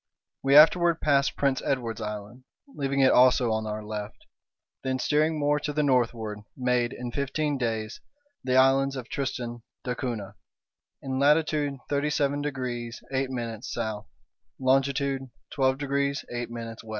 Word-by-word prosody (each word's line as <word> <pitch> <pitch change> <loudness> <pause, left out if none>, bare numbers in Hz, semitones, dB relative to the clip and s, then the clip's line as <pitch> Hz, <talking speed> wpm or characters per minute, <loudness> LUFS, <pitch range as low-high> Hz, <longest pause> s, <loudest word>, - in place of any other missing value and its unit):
We 135 +1 +3
afterward 170 +2 +7
passed 140 -2 +2
Prince 135 -2 +1
Edward's 120 -5 -2
Island, 105 +4 -6 0.2
leaving 140 - -1
it 130 - +6
also 125 -1 +5
on 110 0 -1
our 105 0 -4
left, 105 -1 -6 0.6
then, 130 0 -1
steering 155 +4 +1
more 145 0 +2
to 150 - -3
the 150 +1 0
northward, 115 -6 0 0.2
made, 125 -2 +1
in 120 0 -6
fifteen 145 +3 -1
days, 110 -2 -3 0.4
the 130 -1 0
islands 135 +1 +4
of 125 -3 -7
Tristan 125 -4 -3 0.2
d'Acunha, 120 -5 -4 0.7
in 130 -1 -2
latitude 150 0 +2
37 145 0 0
degrees 125 -4 -4
8' 135 0 0 0.3
S, 125 - -6 0.8
longitude 135 0 +1 0.2
12 130 -1 +2
degrees 140 0 -1
8' 120 -1 -3
W. 115 -1 -6
130 Hz, 135 wpm, -27 LUFS, 120-140 Hz, 0.8 s, afterward